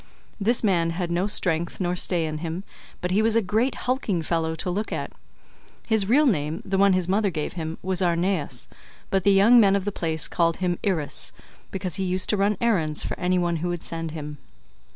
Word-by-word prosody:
This 230 Hz, +4 st, +2 dB
man 175 Hz, -5 st, +2 dB
had 170 Hz, +1 st, -3 dB
no 175 Hz, +3 st, 0 dB
strength 170 Hz, -4 st, 0 dB
nor 180 Hz, -1 st, 0 dB
stay 175 Hz, -2 st, +1 dB
in 155 Hz, -1 st, -4 dB
him, 165 Hz, +3 st, -4 dB, 0.4 s
but 180 Hz, -, -2 dB
he 200 Hz, +3 st, +3 dB
was 225 Hz, 0 st, +2 dB
a -, -, +6 dB
great 220 Hz, +7 st, 0 dB
hulking 225 Hz, -9 st, 0 dB
fellow 160 Hz, -1 st, -1 dB
to 170 Hz, -, -4 dB
look 210 Hz, +4 st, -3 dB
at; -, -, -3 dB, 0.7 s
his 220 Hz, -3 st, +1 dB
real 290 Hz, +6 st, +5 dB
name, 155 Hz, -, 0 dB
the 195 Hz, 0 st, 0 dB
one 200 Hz, -1 st, +5 dB
his 185 Hz, -2 st, 0 dB
mother 200 Hz, +2 st, +2 dB
gave 155 Hz, -4 st, -4 dB
him, 160 Hz, -1 st, -5 dB
was 185 Hz, 0 st, -1 dB
Arnaeus, 170 Hz, -7 st, 0 dB, 0.4 s
but 195 Hz, -1 st, +1 dB
the 200 Hz, -, +5 dB
young 205 Hz, +5 st, +6 dB
men 200 Hz, -3 st, +5 dB
of 200 Hz, -1 st, -1 dB
the 205 Hz, -, -1 dB
place 160 Hz, -4 st, -2 dB
called 165 Hz, -1 st, +1 dB
him 180 Hz, -2 st, -1 dB
Irus,148 175 Hz, -8 st, -2 dB, 0.3 s
because 185 Hz, -3 st, -3 dB
he 195 Hz, -, -1 dB
used 185 Hz, 0 st, +1 dB
to 210 Hz, -, +1 dB
run 200 Hz, +1 st, +1 dB
errands 170 Hz, -10 st, +1 dB
for -, -, -3 dB
any 185 Hz, 0 st, +1 dB
one 175 Hz, -1 st, 0 dB
who 175 Hz, +2 st, -2 dB
would 175 Hz, -1 st, -3 dB
send 165 Hz, -1 st, -4 dB
him. 150 Hz, -2 st, -7 dB
180 Hz, 215 wpm, -24 LUFS, 165-200 Hz, 0.7 s, a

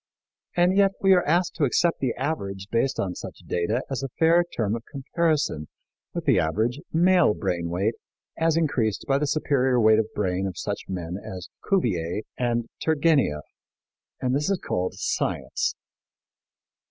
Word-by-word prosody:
And 175 Hz, +2 st, +4 dB
yet 195 Hz, -1 st, +4 dB
we 195 Hz, -1 st, +6 dB
are 180 Hz, -1 st, +4 dB
asked 175 Hz, +3 st, +2 dB
to 160 Hz, -, 0 dB
accept 165 Hz, +5 st, +2 dB
the 130 Hz, -3 st, -1 dB
average 100 Hz, -10 st, -3 dB
based 115 Hz, +3 st, +1 dB
on 95 Hz, -2 st, -1 dB
such -, -, -9 dB
data 105 Hz, +9 st, -1 dB
as 135 Hz, -2 st, -3 dB
a 135 Hz, -, -3 dB
fair 165 Hz, +2 st, +5 dB
term 110 Hz, -1 st, +1 dB
of 115 Hz, -, -5 dB
comparison 145 Hz, -, 0 dB, 0.5 s
with -, -, -3 dB
the -, -, +4 dB
average 110 Hz, -, 0 dB
male 175 Hz, -, +4 dB
brain 85 Hz, -3 st, -2 dB
weight 95 Hz, +6 st, 0 dB, 0.4 s
as 165 Hz, 0 st, +2 dB
increased 120 Hz, -10 st, 0 dB
by 135 Hz, 0 st, +2 dB
the 150 Hz, -, 0 dB
superior 130 Hz, -4 st, +2 dB
weight 110 Hz, -1 st, +5 dB
of 110 Hz, -, 0 dB
brain 95 Hz, -1 st, 0 dB
of 90 Hz, -2 st, -6 dB
such 100 Hz, +3 st, -4 dB
men 90 Hz, -1 st, -4 dB
as 90 Hz, -1 st, -7 dB, 0.2 s
Cuvier 105 Hz, -, +1 dB
and 120 Hz, -2 st, 0 dB, 0.2 s
Turgenieff. 145 Hz, -, +2 dB, 0.8 s
And 130 Hz, 0 st, 0 dB
this 150 Hz, +6 st, 0 dB
is 195 Hz, -, +2 dB
called 90 Hz, -, -2 dB
science! -, -, -1 dB
125 Hz, 160 wpm, -25 LUFS, 95-160 Hz, 0.8 s, we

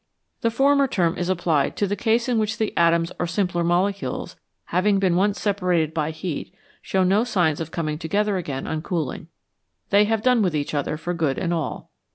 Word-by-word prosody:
The 230 Hz, -, +2 dB
former 275 Hz, +4 st, +3 dB
term 175 Hz, -8 st, +1 dB
is 175 Hz, 0 st, -2 dB
applied 165 Hz, -6 st, +1 dB
to 205 Hz, -, +1 dB
the 200 Hz, +1 st, -1 dB
case 230 Hz, +2 st, +1 dB
in 240 Hz, -3 st, +1 dB
which 215 Hz, +1 st, -1 dB
the 220 Hz, -, -2 dB
atoms 170 Hz, 0 st, +3 dB
or 175 Hz, -, 0 dB
simpler 175 Hz, -1 st, 0 dB
molecules, 185 Hz, +4 st, -1 dB, 0.4 s
having 195 Hz, +3 st, +3 dB
been 190 Hz, -3 st, +2 dB
once 200 Hz, +3 st, +1 dB
separated 180 Hz, -6 st, 0 dB
by 155 Hz, -2 st, -1 dB
heat, 160 Hz, 0 st, -5 dB, 0.3 s
show 190 Hz, -1 st, 0 dB
no 195 Hz, +4 st, +3 dB
signs 175 Hz, -10 st, +1 dB
of 165 Hz, -1 st, -4 dB
coming 155 Hz, -2 st, -3 dB
together 205 Hz, +5 st, 0 dB
again 140 Hz, -7 st, -4 dB
on 155 Hz, -1 st, -3 dB
cooling; 160 Hz, -5 st, -3 dB, 0.6 s
they 205 Hz, +1 st, +5 dB
have 220 Hz, 0 st, 0 dB
done 250 Hz, -2 st, +4 dB
with 180 Hz, -6 st, +1 dB
each 145 Hz, 0 st, -2 dB
other 145 Hz, +1 st, -1 dB
for 175 Hz, +3 st, -3 dB
good 155 Hz, -6 st, 0 dB
and 175 Hz, -1 st, -1 dB
all. 160 Hz, -3 st, -4 dB
180 Hz, 200 wpm, -23 LUFS, 165-205 Hz, 0.6 s, they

